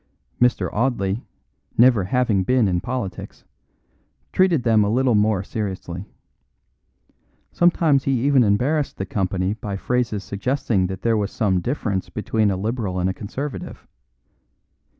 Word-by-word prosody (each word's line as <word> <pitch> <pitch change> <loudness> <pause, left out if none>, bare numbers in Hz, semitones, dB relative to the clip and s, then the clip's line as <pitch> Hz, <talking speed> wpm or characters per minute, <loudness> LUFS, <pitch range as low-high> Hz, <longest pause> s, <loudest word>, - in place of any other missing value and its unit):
Mr. 125 0 +3
Audley, 110 -2 0 0.5
never 120 -5 +5
having 115 -2 +1
been 125 +1 +2
in 90 -2 0
politics, 105 -8 -5 0.9
treated 180 -8 +3
them 110 -3 +4
a 100 - 0
little 125 +2 +2
more 105 -2 +2
seriously. 95 -3 -5 1.4
Sometimes 165 -5 +3
he 135 -2 +1
even 140 -3 +5
embarrassed 130 +9 +1
the 95 - -3
company 95 0 -1
by 105 -3 -5
phrases 120 -2 -1
suggesting 110 -1 -1
that 95 0 -7
there 115 -1 +2
was 105 -1 -1
some 95 -5 +1
difference 105 -4 -2
between 110 0 0
a 95 - -1
Liberal 105 -2 -2
and 90 +1 +1
a - - -5
Conservative. 130 +9 -6
110 Hz, 130 wpm, -22 LUFS, 95-125 Hz, 1.4 s, never